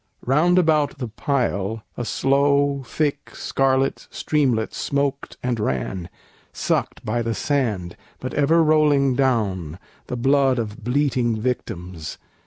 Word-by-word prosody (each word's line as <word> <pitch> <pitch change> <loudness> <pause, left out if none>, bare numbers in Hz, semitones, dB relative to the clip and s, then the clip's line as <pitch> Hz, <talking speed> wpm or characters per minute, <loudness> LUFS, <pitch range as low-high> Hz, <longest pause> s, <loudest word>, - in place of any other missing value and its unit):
Round 155 +8 +3
about 155 -4 +3
the 125 -4 -4
pile 110 -4 -1
A 120 - -4
slow, 140 +2 +2
thick, 145 +4 -2
scarlet 135 0 0
streamlet 130 -8 0
smoked 140 -1 -2
and 125 -2 -1
ran, 85 +2 -2 0.4
Sucked - - -2
by 120 +3 0
the 115 -1 -2
sand, 110 -12 -1 0.2
but 130 -1 -5
ever 160 +4 +4
rolling 150 -3 +4
down, 100 - 0 0.3
The 125 - -3
blood 135 +1 +3
of 110 0 -4
bleating 125 -3 +1
victims. 90 - -4
130 Hz, 120 wpm, -22 LUFS, 110-140 Hz, 0.4 s, ever